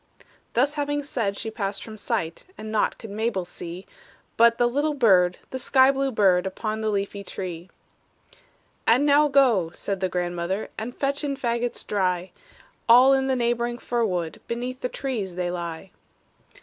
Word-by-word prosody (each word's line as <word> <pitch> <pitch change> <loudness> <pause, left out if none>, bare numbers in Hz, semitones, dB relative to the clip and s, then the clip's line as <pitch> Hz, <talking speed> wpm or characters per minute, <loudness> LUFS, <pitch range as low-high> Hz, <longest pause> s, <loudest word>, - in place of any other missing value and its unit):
Thus 270 +5 +2
having 290 -1 -1
said, 225 -8 -2
she 225 - -4
passed 200 -3 -3
from 220 - -9
sight, 205 -6 -3
And 215 0 -7
naught 215 - +1
could 220 - -9
Mabel 215 -3 -1
see, 175 +1 -8 0.5
But 230 0 +5
the 240 - +3
little 290 +5 0
bird, 185 -8 +4
the 260 - -4
sky 260 +1 +5
blue 275 0 -1
bird, 190 -5 +3
Upon 215 +3 -3
the 220 - 0
leafy 200 0 -2
tree. 180 -2 -6 1.2
"And 245 +6 +5
now 295 +1 +5
go," 245 - +3
said 195 -1 -3
the 185 0 0
grandmother, 175 +3 -2
"And 230 +3 -6
fetch 280 +1 -1
in 280 -1 -1
fagots 240 -2 -2
dry; 185 -3 -1 0.6
All 255 +3 +8
in 265 0 +2
the 265 - +1
neighboring 240 0 0
fir 240 -1 -1
wood 175 -6 -2
Beneath 245 +2 -4
the 250 - -1
trees 220 -11 -4
they 175 -1 -2
lie." 170 +1 -6
220 Hz, 165 wpm, -25 LUFS, 185-255 Hz, 1.2 s, All